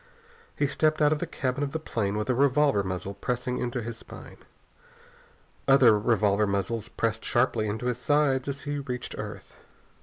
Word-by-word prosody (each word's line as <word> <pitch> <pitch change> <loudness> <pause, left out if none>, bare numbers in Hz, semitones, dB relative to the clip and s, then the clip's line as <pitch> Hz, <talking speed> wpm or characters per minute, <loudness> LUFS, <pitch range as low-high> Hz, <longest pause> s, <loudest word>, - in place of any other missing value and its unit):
He 145 - +1
stepped 155 +2 +1
out 150 -1 +4
of 150 - -2
the 175 - -3
cabin 130 -3 -2
of 140 - -3
the 160 - -1
plane 105 -9 -2
with 105 - -2
a 130 - +2
revolver 140 -3 +3
muzzle 95 +1 -4
pressing 125 +4 -3
into 120 -1 -2
his 115 +1 -6
spine. - - -11 1.3
Other 130 -5 +7
revolver 105 -2 +2
muzzles 100 +3 -1
pressed 115 -1 -2
sharply 120 -3 +1
into 110 +3 -3
his 125 -1 -1
sides 140 -1 +2
as 140 0 -4
he 145 0 -3
reached 125 -3 -5
earth. - - -7
125 Hz, 175 wpm, -27 LUFS, 110-140 Hz, 1.3 s, Other